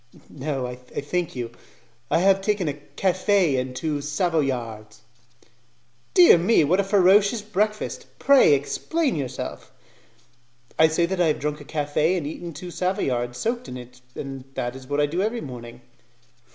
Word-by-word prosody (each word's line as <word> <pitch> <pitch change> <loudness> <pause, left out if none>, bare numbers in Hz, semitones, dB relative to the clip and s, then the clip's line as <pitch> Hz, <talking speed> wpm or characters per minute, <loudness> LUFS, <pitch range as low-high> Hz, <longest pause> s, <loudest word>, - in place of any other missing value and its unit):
"No, 135 -2 -3
I 125 0 -6
thank 145 +7 -4
you. 120 -2 -4 0.6
I - - +2
have 195 +1 +4
taken 200 -3 0
a 145 - 0
'cafe' 185 +2 +1
and 130 0 -3
two 150 +1 -2
'Savoyards'." 130 - -2 1.1
"Dear 175 -1 +8
me! 180 +1 +4
What 175 +6 +2
a - - +3
ferocious 200 +2 +4
breakfast! 215 +1 -2
Pray, 275 - +6
explain 290 - -1
yourself." 135 -5 -5 1.1
"I 160 - +7
say 160 +2 +1
that 185 +1 -2
I 170 - +4
have 155 - +1
drunk 150 0 -3
a - - -11
cafe 150 +4 0
and 165 - -3
eaten 170 +3 -6
two 175 +4 -8
Savoyards 130 -11 -1
soaked 240 - -2
in 125 - -6
it, 125 0 -12
and 135 -2 -7
that 120 +1 -3
is 130 -1 -11
what 145 +1 -1
I 145 - +4
do 165 +5 -2
every 225 +4 -1
morning." 120 - -9
155 Hz, 160 wpm, -24 LUFS, 130-190 Hz, 1.1 s, Dear